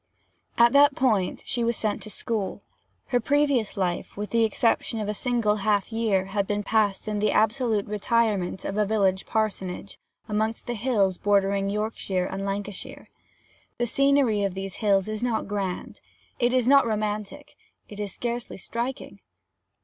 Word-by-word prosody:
At 235 Hz, 0 st, +6 dB
that 285 Hz, 0 st, +6 dB
period 215 Hz, -8 st, +1 dB
she 240 Hz, -, -1 dB
was 235 Hz, 0 st, 0 dB
sent 215 Hz, -2 st, -1 dB
to 215 Hz, -, -7 dB
school. 210 Hz, 0 st, -3 dB, 0.5 s
Her 245 Hz, -, +2 dB
previous 280 Hz, -3 st, +1 dB
life, 180 Hz, -1 st, -2 dB
with 210 Hz, 0 st, -4 dB
the 230 Hz, -1 st, +3 dB
exception 225 Hz, +1 st, +1 dB
of 210 Hz, -, -3 dB
a 210 Hz, -, -1 dB
single 225 Hz, -2 st, 0 dB
half 205 Hz, 0 st, 0 dB
year, 215 Hz, -4 st, +1 dB
had 200 Hz, -2 st, 0 dB
been 205 Hz, 0 st, -1 dB
passed 210 Hz, -1 st, +1 dB
in 210 Hz, -1 st, -1 dB
the 210 Hz, -, +2 dB
absolute 220 Hz, -1 st, +2 dB
retirement 210 Hz, -3 st, 0 dB
of 195 Hz, -, -3 dB
a 210 Hz, -, +3 dB
village 195 Hz, -3 st, +1 dB
parsonage, 200 Hz, -3 st, -2 dB, 0.3 s
amongst 220 Hz, +1 st, -1 dB
the 240 Hz, -, -3 dB
hills 205 Hz, -6 st, +1 dB
bordering 200 Hz, -1 st, +2 dB
Yorkshire 205 Hz, -3 st, -1 dB
and 195 Hz, +1 st, -4 dB
Lancashire. 200 Hz, 0 st, -5 dB, 0.7 s
The 240 Hz, -, 0 dB
scenery 275 Hz, -4 st, +3 dB
of 195 Hz, -2 st, -1 dB
these 195 Hz, 0 st, -5 dB
hills 200 Hz, -3 st, +2 dB
is 215 Hz, 0 st, -4 dB
not 240 Hz, -3 st, -1 dB
grand 195 Hz, -3 st, -4 dB, 0.4 s
it 240 Hz, -1 st, +3 dB
is 250 Hz, -2 st, +2 dB
not 275 Hz, -2 st, +6 dB
romantic 215 Hz, +6 st, -3 dB, 0.3 s
it 205 Hz, -, -10 dB
is 205 Hz, -2 st, -3 dB
scarcely 240 Hz, +3 st, -4 dB
striking. 235 Hz, +6 st, -5 dB
215 Hz, 160 wpm, -26 LUFS, 200-235 Hz, 0.7 s, At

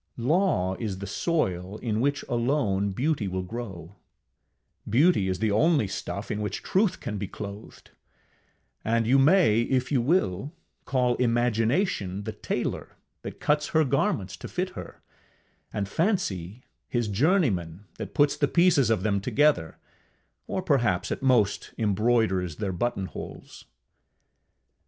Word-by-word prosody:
Law 125 Hz, -, +1 dB
is 105 Hz, -5 st, -3 dB
the 100 Hz, -, -6 dB
soil 100 Hz, -, -1 dB
in 110 Hz, -2 st, -2 dB
which 145 Hz, +2 st, 0 dB
alone 120 Hz, -5 st, 0 dB
beauty 130 Hz, +1 st, -1 dB
will 95 Hz, 0 st, -3 dB
grow; 95 Hz, -4 st, -7 dB, 0.9 s
beauty 130 Hz, -, +4 dB
is 95 Hz, -, -1 dB
the 110 Hz, +2 st, 0 dB
only 145 Hz, -, +3 dB
stuff 100 Hz, +2 st, -5 dB
in 105 Hz, 0 st, -2 dB
which 105 Hz, -, -4 dB
Truth 190 Hz, -1 st, +1 dB
can 105 Hz, -3 st, -4 dB
be 100 Hz, -, -3 dB
clothed; 100 Hz, +1 st, -9 dB, 0.9 s
and 115 Hz, +1 st, +1 dB
you 130 Hz, +4 st, +4 dB
may, 145 Hz, -, +5 dB
if 130 Hz, +2 st, 0 dB
you 135 Hz, -4 st, +3 dB
will, 135 Hz, -, 0 dB, 0.3 s
call 125 Hz, -2 st, +1 dB
Imagination 115 Hz, -, +1 dB
the 110 Hz, -, -4 dB
tailor 105 Hz, -, -4 dB, 0.2 s
that -, -, -8 dB
cuts 150 Hz, 0 st, +1 dB
her 160 Hz, 0 st, +3 dB
garments 125 Hz, -8 st, 0 dB
to -, -, -8 dB
fit -, -, -3 dB
her, -, -, -10 dB, 0.7 s
and 100 Hz, -2 st, -2 dB
Fancy 115 Hz, -, -1 dB, 0.2 s
his 120 Hz, -3 st, -1 dB
journeyman 105 Hz, -, +1 dB
that -, -, -7 dB
puts 145 Hz, -1 st, +3 dB
the 145 Hz, -, +1 dB
pieces 170 Hz, -, +4 dB
of 110 Hz, -5 st, +1 dB
them 100 Hz, -2 st, +1 dB
together, 125 Hz, -, +2 dB, 0.7 s
or 190 Hz, -, -2 dB
perhaps 115 Hz, -, +1 dB
at -, -, -3 dB
most 120 Hz, -7 st, +1 dB
embroiders 105 Hz, -5 st, +1 dB
their 100 Hz, -3 st, -3 dB
button 100 Hz, +1 st, -1 dB
holes. -, -, -9 dB
115 Hz, 140 wpm, -26 LUFS, 100-140 Hz, 0.9 s, may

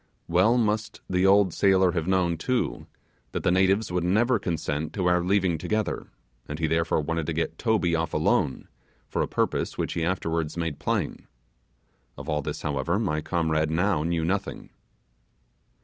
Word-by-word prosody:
Well 95 Hz, +8 st, +4 dB
must 110 Hz, -2 st, 0 dB
the 90 Hz, +1 st, +2 dB
old 100 Hz, -2 st, +5 dB
sailor 95 Hz, -2 st, +4 dB
have 85 Hz, -1 st, -2 dB
known, 90 Hz, -3 st, +2 dB
too, 125 Hz, +10 st, -2 dB, 0.5 s
that -, -, -3 dB
the -, -, +3 dB
natives 95 Hz, +2 st, +2 dB
would 90 Hz, -1 st, 0 dB
never 110 Hz, +7 st, +2 dB
consent 80 Hz, -4 st, -3 dB
to 95 Hz, -4 st, -2 dB
our 90 Hz, 0 st, +3 dB
leaving 90 Hz, -3 st, +1 dB
together, 110 Hz, +4 st, -2 dB, 0.4 s
and 75 Hz, -, -5 dB
he 80 Hz, -, 0 dB
therefore 80 Hz, 0 st, +1 dB
wanted 80 Hz, +1 st, -2 dB
to 85 Hz, -, -1 dB
get 80 Hz, +1 st, -2 dB
Toby 105 Hz, -8 st, +1 dB
off 80 Hz, -1 st, -1 dB
alone, 65 Hz, -, +1 dB, 0.4 s
for -, -, -2 dB
a -, -, 0 dB
purpose -, -, -1 dB
which -, -, -2 dB
he 85 Hz, -, -2 dB
afterwards 85 Hz, -2 st, -1 dB
made 85 Hz, -4 st, -3 dB
plain. -, -, -2 dB, 0.9 s
Of 75 Hz, +1 st, -8 dB
all 75 Hz, -2 st, 0 dB
this, -, -, -5 dB
however, 75 Hz, +5 st, 0 dB
my 90 Hz, -8 st, -1 dB
comrade 80 Hz, -2 st, 0 dB
now 85 Hz, 0 st, +1 dB
knew 85 Hz, 0 st, 0 dB
nothing. 95 Hz, +4 st, -3 dB
85 Hz, 165 wpm, -26 LUFS, 80-95 Hz, 0.9 s, old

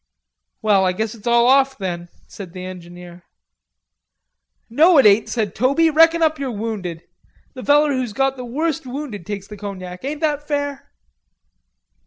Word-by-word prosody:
"Well, 205 Hz, -3 st, +3 dB
I 185 Hz, -1 st, +1 dB
guess 220 Hz, +3 st, -3 dB
it's 230 Hz, -1 st, -11 dB
all 235 Hz, 0 st, +4 dB
off, 270 Hz, +1 st, +3 dB
then," 175 Hz, -3 st, -5 dB, 0.2 s
said 185 Hz, -4 st, -11 dB
the 185 Hz, 0 st, -7 dB
engineer. 175 Hz, -1 st, -11 dB, 1.5 s
"No, 315 Hz, +8 st, +4 dB
it 270 Hz, -, +6 dB
ain't," 210 Hz, +1 st, +5 dB
said 220 Hz, -4 st, -2 dB
Toby, 280 Hz, +6 st, +2 dB
"reckon 325 Hz, +2 st, +5 dB
up 315 Hz, -1 st, +1 dB
yer 275 Hz, -2 st, -3 dB
wounded. 205 Hz, -7 st, -5 dB, 0.5 s
The 255 Hz, -, -9 dB
feller 295 Hz, +1 st, +4 dB
who's 255 Hz, -3 st, -2 dB
got 270 Hz, +4 st, 0 dB
the 250 Hz, -, -7 dB
worst 280 Hz, +3 st, -3 dB
wounded 250 Hz, -, -6 dB
gets 200 Hz, -1 st, -5 dB
the 210 Hz, -, -10 dB
cognac. 185 Hz, -2 st, -8 dB
Ain't 290 Hz, +3 st, -4 dB
that 295 Hz, -2 st, -1 dB
fair?" 285 Hz, -2 st, -3 dB
235 Hz, 160 wpm, -20 LUFS, 195-285 Hz, 1.5 s, it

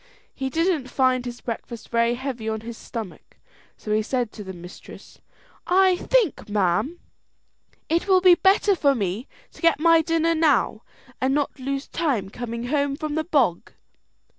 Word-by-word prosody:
He 265 Hz, -1 st, -3 dB
didn't 325 Hz, -3 st, 0 dB
find 255 Hz, -1 st, +2 dB
his 240 Hz, 0 st, -7 dB
breakfast 230 Hz, -1 st, -7 dB
very 235 Hz, 0 st, +2 dB
heavy 245 Hz, -4 st, -4 dB
on 220 Hz, 0 st, -3 dB
his 230 Hz, +1 st, -7 dB
stomach; 225 Hz, -4 st, -8 dB, 0.4 s
so 210 Hz, -, -3 dB
he 215 Hz, -, +2 dB
said 240 Hz, 0 st, -2 dB
to 210 Hz, -, -9 dB
the 190 Hz, -, -7 dB
mistress, 175 Hz, 0 st, -12 dB, 0.5 s
"I 375 Hz, 0 st, +4 dB
think, 415 Hz, -, 0 dB
ma'am, 205 Hz, -, 0 dB, 0.9 s
it 335 Hz, +5 st, 0 dB
will 380 Hz, -1 st, +5 dB
be 365 Hz, -1 st, +7 dB
better 390 Hz, +2 st, +3 dB
for 280 Hz, -5 st, +2 dB
me 205 Hz, +3 st, -3 dB, 0.2 s
to -, -, -17 dB
get 335 Hz, -3 st, +3 dB
my 330 Hz, 0 st, +5 dB
dinner 330 Hz, +1 st, +1 dB
now, 295 Hz, -8 st, +2 dB, 0.4 s
and 265 Hz, +1 st, +2 dB
not 290 Hz, -2 st, -1 dB
lose 275 Hz, +1 st, -3 dB
time 255 Hz, -, -1 dB
coming 235 Hz, 0 st, -5 dB
home 285 Hz, -1 st, 0 dB
from 305 Hz, 0 st, -4 dB
the 315 Hz, +1 st, 0 dB
bog." 255 Hz, -, +1 dB
265 Hz, 165 wpm, -24 LUFS, 230-325 Hz, 0.9 s, be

